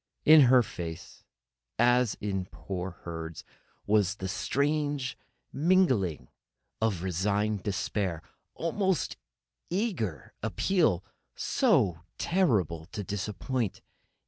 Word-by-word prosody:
In 155 0 +9
her 125 -1 +6
face, 85 -2 -7 0.5
as 120 -1 +3
in 95 -3 -2
poor 95 -1 -5
Herd's, 80 -2 -6 0.4
was 105 -1 +3
that 95 - -5
same 95 - -3
strange 145 -1 0 0.4
mingling 135 - +2 0.5
of 100 -6 0
resigned 100 +3 0
despair 95 -3 -2 0.3
and - - -6
almost 190 +1 0 0.5
eager 170 - -2
appeal, 160 - +1 0.3
so 85 -4 +2 0.2
terrible 100 - +1
to 105 -2 -5
disappoint. 105 +3 -3
105 Hz, 95 wpm, -29 LUFS, 90-140 Hz, 0.5 s, In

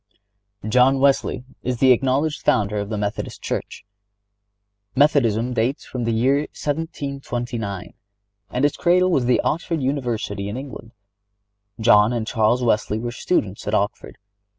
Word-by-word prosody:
(98) 110 - -4
John 130 +3 +4
Wesley 135 -3 +2 0.2
is 125 0 -2
the 130 +1 +5
acknowledged 135 +5 +1
founder 105 0 +1
of 100 0 -4
the 110 - -2
Methodist 105 0 -4
Church. - - -4 1.1
Methodism 125 -5 +3
dates 120 +4 -1
from 125 -2 -4
the 115 - 0
year 125 +5 +2
1729, 135 - -4 0.6
and 125 +3 0
its 145 - 0
cradle 180 +1 +3
was 130 -7 +2
the 125 - +3
Oxford 165 0 -1
University 120 -7 -2
in 105 - -5
England. 130 -4 -9 0.9
John 110 0 +5
and 115 -2 -2
Charles 115 +2 +1
Wesley 105 -2 +1
were 120 +2 -4
students 105 - -2
at 105 - +1
Oxford. 100 0 -2
125 Hz, 140 wpm, -22 LUFS, 110-140 Hz, 1.1 s, the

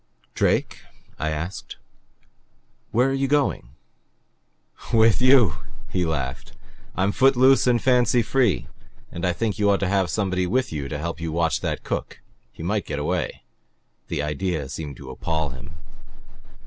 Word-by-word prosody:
"Drake," - - +1 0.4
I 80 - -1
asked. 80 +5 -5 1.1
"Where 125 +4 +3
are 135 - 0
you 135 0 0
going?" 135 - 0 1.2
"With 115 -1 +4
you," 125 - +5 0.3
he 90 -2 0
laughed. 65 -4 -4 0.4
"I'm 95 +2 +1
foot 135 +4 +4
loose 130 +1 +5
and 120 -1 +4
fancy 125 -1 +3
free. 110 - +1 0.5
And 85 - -6
I - - +2
think 105 +3 -2
you 105 -1 +3
ought 100 - +3
to 95 - +1
have 95 -2 +1
somebody 90 +1 0
with 125 +1 0
you 70 -3 -4
to 75 - -3
help 85 +2 -4
watch 80 0 0
that - - -3
cook. - - -4 0.3
He - - -10
might - - -1
get - - -3
away." 75 -1 -2 0.6
The 70 - -2
idea 75 -1 -2
seemed 70 -2 -6
to 65 -2 -9
appall 80 +3 -2
him. 65 +4 -10
90 Hz, 150 wpm, -24 LUFS, 75-120 Hz, 1.2 s, you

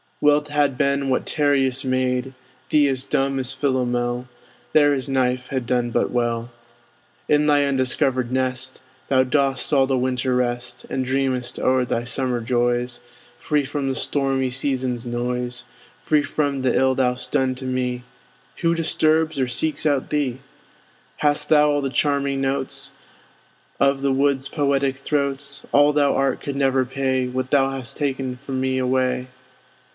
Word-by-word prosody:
Well 150 0 +4
't 150 0 -14
had 145 -3 +1
been 140 0 +1
had 130 - 0
Tereus 135 -3 +1
made 130 0 0 0.4
Thee 150 -2 +4
as 130 -1 -1
dumb 135 0 0
as 130 0 -2
Philomel; 125 -2 -1 0.5
There 145 -1 +5
his 130 -2 -3
knife 130 -1 0
had 130 -3 -2
done 120 -1 0
but - - +1
well. 120 -1 -1 0.8
In 150 0 +3
thy 145 -1 +4
undiscovered 130 -2 0
nest 130 0 -2 0.3
Thou 130 -1 +4
dost 135 -1 0
all 135 -2 +5
the 130 -1 0
winter 125 0 0
rest, 120 0 -2
And 130 - -2
dreamest 130 -1 -1
o'er 130 -1 +2
thy 120 -1 -1
summer 125 0 -1
joys, 120 +1 0 0.4
Free 150 -2 0
from 140 0 -3
the 135 - -1
stormy 135 -2 0
season's 130 -2 -2
noise: 125 +1 -3 0.4
Free 150 -1 +2
from 140 -3 -1
th' 130 - +2
ill 130 0 +3
thou'st 125 -1 -1
done 130 -1 +1
to 130 - -7
me; 125 -1 -2 0.5
Who 165 0 +1
disturbs 160 -2 +1
or 130 - +1
seeks 155 +6 -1
out 145 -3 +1
thee? 140 -4 -1 0.8
Hadst 145 -1 +1
thou 150 -1 +5
all 145 0 +1
the 135 - -1
charming 140 -1 0
notes 135 0 -1 0.9
Of 140 0 +2
the 140 0 +1
wood's 135 0 +1
poetic 140 -2 0
throats, 140 0 -2
All 145 +1 +5
thou 145 -1 +2
art 135 0 0
could 140 - -4
never 135 -1 +2
pay 130 0 -1
What 130 +1 -3
thou 135 -1 +3
hast 130 -3 -5
ta'en 135 -3 -2
from 135 -2 -3
me 130 0 0
away. 130 0 0
130 Hz, 160 wpm, -22 LUFS, 125-140 Hz, 0.9 s, There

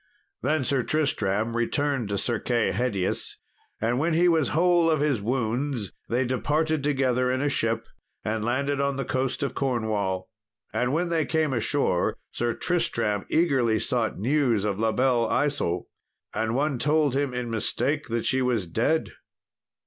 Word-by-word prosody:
Then 145 +3 +1
Sir 135 0 +2
Tristram 115 -7 0
returned 130 0 0
to 100 - -1
Sir 115 +1 0
Kay 120 -3 +1
Hedius, 110 -7 -2 0.4
and 120 +3 0
when 160 +2 +1
he 175 +2 +4
was 160 -6 +3
whole 170 +1 +3
of 155 -2 +2
his 140 -7 +1
wounds, 120 -1 -1 0.2
they 125 +3 +1
departed 150 +5 0
together 130 -3 +1
in 130 - 0
a 145 - +1
ship, 115 -5 0 0.4
and 110 0 -1
landed 140 +4 0
on 140 0 0
the 135 - -3
coast 130 +1 -1
of 140 - -2
Cornwall. 110 -8 -1 0.5
And 125 +1 0
when 170 +4 0
they 165 -2 +1
came 160 -3 +1
ashore, 115 -4 +1
Sir 120 0 -1
Tristram 115 - 0
eagerly 135 -9 +2
sought 115 0 -1
news 120 -2 +1
of 100 -1 -1
La 110 0 +2
Belle 120 -2 +2
Isault. 140 -12 0 0.5
And 110 +1 -1
one 140 -1 0
told 150 0 +2
him 140 -2 0
in 125 -1 -3
mistake 130 +6 -1
that 115 0 -2
she 130 0 +2
was 120 -6 +1
dead. 120 - 0
130 Hz, 160 wpm, -26 LUFS, 115-145 Hz, 0.5 s, he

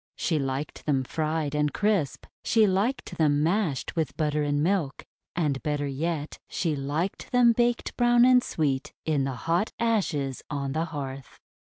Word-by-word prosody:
She 160 -3 0
liked 135 +3 -4
them 135 -3 +2
fried 155 +1 -2
and 150 0 +1
crisp. 205 -8 0 0.2
She 225 -2 +4
liked 205 +6 -1
them 150 -2 +3
mashed 170 - 0
with 160 -3 -2
butter 150 -1 0
and 145 0 +1
milk. 170 -6 0 0.3
And, 150 -6 0
better 145 -1 -1
yet, 150 +2 -3
she 165 -4 -1
liked 145 +7 -3
them 245 -2 +6
baked 240 +1 0
brown 240 0 +5
and 250 0 +6
sweet 140 -4 -1
in 145 -4 +1
the 135 -1 -3
hot 170 +6 +1
ashes 180 - 0
on 140 -2 -2
the 160 +4 0
hearth. 135 -5 -7
155 Hz, 160 wpm, -27 LUFS, 145-195 Hz, 0.3 s, them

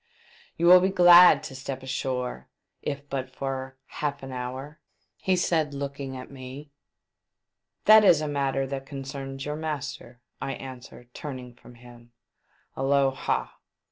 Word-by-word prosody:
" - - -28
You 170 - 0
will 180 +1 +9
be 190 +1 +2
glad 175 -1 +8
to - - -7
step 130 0 -6
ashore 125 - -3 0.3
if 140 0 -5
but 135 -2 -4
for 130 0 -5
half 145 -2 -4
an 135 - -7
hour 130 +4 -6 0.2
?" 190 - -2
said 160 -4 0
he, - - -6
looking 140 -1 -5
at 130 - -10
me. 135 +2 -10 1.1
'• - - -45
That 215 0 +8
is 175 -6 +6
a 155 - -2
matter 135 -2 -1
that 135 0 -6
concerns 135 -1 -6
your 150 +1 -3
master," 145 -5 -5 0.2
I 135 - -3
answered, 125 -2 -11
turning 130 -4 -7
from 120 0 -16
him. 120 0 -16 0.6
A - - -5
low 135 0 +3
ha 135 - -3
135 Hz, 160 wpm, -26 LUFS, 130-150 Hz, 1.1 s, will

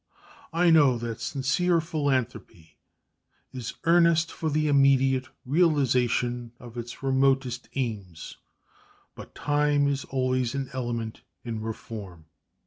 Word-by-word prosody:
I 170 +1 +3
know 145 -6 +5
that 115 -1 -5
sincere 160 +6 +1
philanthropy 130 - -3 0.8
is 125 -3 -6
earnest 170 -1 +4
for 160 - -3
the 155 +1 +1
immediate 135 -2 +3 0.2
realization 125 -6 +1
of 120 -1 -12
its 120 +2 -7
remotest 135 -2 +1
aims; 100 -11 -5 0.8
but - - -12
time 145 -1 +1
is 140 -1 -1
always 130 -1 -1
an 135 -1 -4
element 120 -3 -4 0.2
in 115 -2 -4
reform. 105 -6 -7
130 Hz, 110 wpm, -26 LUFS, 120-145 Hz, 0.8 s, know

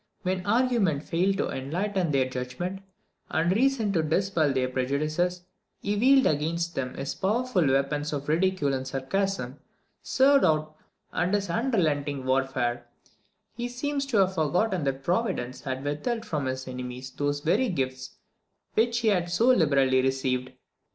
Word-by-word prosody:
When 185 0 -1
argument 220 - +2
failed 190 +4 +1
to - - -1
enlighten 175 +7 -2
their 135 -3 +2
judgment, 130 +10 -5 0.5
and 165 +2 +1
reason 235 -4 +2
to 165 - +2
dispel 160 -1 +1
their 130 -1 +1
prejudices, 155 +8 -1 0.4
he 205 +1 -1
wielded 265 +5 +5
against 170 +3 0
them 130 -1 -3
his 135 - -4
powerful 210 - +1
weapons 140 +2 0
of 145 -1 -4
ridicule 165 -2 +1
and 130 0 -3
sarcasm; 135 0 -2 0.6
and 260 - +5 0.5
in 180 +2 0
this 200 -3 0
unrelenting 155 - 0
warfare, 130 -2 0 0.7
he 240 +1 -3
seems 275 +3 -2
to 250 -6 0
have 190 -1 +3
forgotten 175 +1 0
that 135 0 -2
Providence 170 - -1
had 130 0 -4
withheld 225 - -2
from 150 -5 -2
his 130 0 -4
enemies 125 0 -6
those 145 +1 -2
very 215 - +2
gifts 130 -6 -3 0.6
which 235 +1 +2
he 225 - +3
had 180 -4 +1
so 230 +8 +3
liberally 140 - +4
received. 130 -1 -1
160 Hz, 145 wpm, -27 LUFS, 135-200 Hz, 0.7 s, wielded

